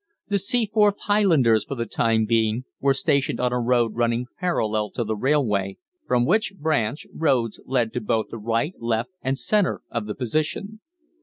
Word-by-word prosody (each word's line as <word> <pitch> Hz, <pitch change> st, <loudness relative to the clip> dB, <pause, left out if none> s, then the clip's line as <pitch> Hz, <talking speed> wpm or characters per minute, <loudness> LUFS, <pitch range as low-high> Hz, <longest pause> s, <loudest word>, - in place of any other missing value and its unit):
The 200 Hz, -1 st, +2 dB
Seaforth 210 Hz, -1 st, +2 dB
Highlanders 160 Hz, -, +3 dB
for 140 Hz, -, -6 dB
the 115 Hz, -2 st, -2 dB
time 110 Hz, 0 st, +1 dB
being 110 Hz, +1 st, +1 dB, 0.2 s
were 135 Hz, 0 st, +2 dB
stationed 140 Hz, 0 st, 0 dB
on 125 Hz, 0 st, +1 dB
a 125 Hz, -, +1 dB
road 120 Hz, -2 st, +2 dB
running 120 Hz, +1 st, 0 dB
parallel 110 Hz, -, 0 dB
to 120 Hz, -, -1 dB
the 110 Hz, 0 st, -2 dB
railway, 105 Hz, -7 st, 0 dB, 0.3 s
from 120 Hz, 0 st, +2 dB
which 200 Hz, -, +1 dB
branch 145 Hz, -5 st, -1 dB
roads 130 Hz, -8 st, 0 dB
led 120 Hz, -4 st, 0 dB
to 125 Hz, -, -2 dB
both 110 Hz, +1 st, -1 dB
the 115 Hz, -, -6 dB
right, 115 Hz, -, -1 dB
left, 115 Hz, +6 st, -1 dB
and 135 Hz, +1 st, -1 dB
centre 205 Hz, +4 st, +1 dB
of 115 Hz, -3 st, -3 dB
the 105 Hz, -, -4 dB
position. 155 Hz, -, -2 dB
125 Hz, 170 wpm, -24 LUFS, 115-160 Hz, 0.3 s, Highlanders